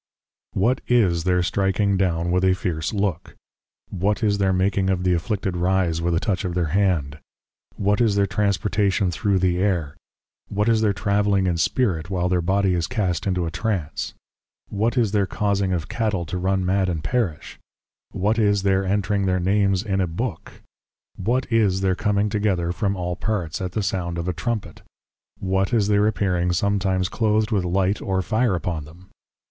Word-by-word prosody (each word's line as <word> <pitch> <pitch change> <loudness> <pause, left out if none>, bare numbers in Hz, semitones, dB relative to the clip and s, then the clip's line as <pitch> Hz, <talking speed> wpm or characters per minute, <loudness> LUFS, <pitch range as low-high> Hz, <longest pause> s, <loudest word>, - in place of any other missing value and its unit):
What 120 +7 +1
is 95 -9 +2
their 90 -1 +2
stricking 95 +3 +1
down 85 -2 0
with 90 +1 +1
a 95 0 +4
fierce 80 -4 -2
Look? 100 -5 -2 0.6
What 105 +5 -1
is 100 -1 +2
their 95 -1 +2
making 95 +1 +1
of 90 -1 0
the 90 -1 +2
Afflicted 95 +2 -2
Rise, 90 -2 +1
with 85 0 0
a - - +2
touch 100 -4 -1
of 90 -2 -3
their 85 -4 0
Hand? 75 -7 0 0.6
What 100 +2 +1
is 110 -4 +3
their 100 0 +3
Transportation 100 -1 0
thro' 100 +3 0
the 90 -1 +1
Air? 90 -7 0 0.5
What 105 +1 0
is 115 -1 +3
their 105 -2 +3
Travelling 100 -1 +1
in 90 -2 0
Spirit, 90 -4 0
while 90 -2 0
their 90 -1 +1
Body 95 +2 +1
is 85 -2 0
cast 100 -8 -1
into 90 -2 0
a 80 - -3
Trance? 90 -4 -3 0.5
What 110 +5 -1
is 115 -5 +2
their 100 -2 +1
causing 100 -2 0
of 85 -3 -2
Cattle 105 -7 -1
to 90 +3 -4
run 95 0 0
mad 95 0 +1
and 80 -4 -3
perish? 110 -12 -2 0.5
What 105 +4 0
is 100 -2 +2
their 95 -1 +2
Entring 100 0 0
their 95 0 +1
Names 100 +1 +1
in 95 -3 0
a 90 - +1
Book? 85 +2 -5 0.5
What 120 +7 0
is 100 -4 +2
their 95 -1 +2
coming 105 +1 0
together 100 -5 0
from 100 +1 -1
all 90 -1 -3
parts, 95 -5 -3
at 90 -1 -4
the 105 - -1
Sound 85 -3 -2
of 85 +1 -3
a 90 - 0
Trumpet? 90 -1 -4 0.6
What 95 0 0
is 105 -4 +2
their 105 0 +3
Appearing 90 -4 0
sometimes 95 0 +1
Cloathed 110 +1 0
with 100 -4 +1
Light 95 +3 0
or 95 -2 -1
Fire 110 -1 +1
upon 80 -2 -3
them? 85 +5 -16
95 Hz, 185 wpm, -23 LUFS, 90-105 Hz, 0.6 s, a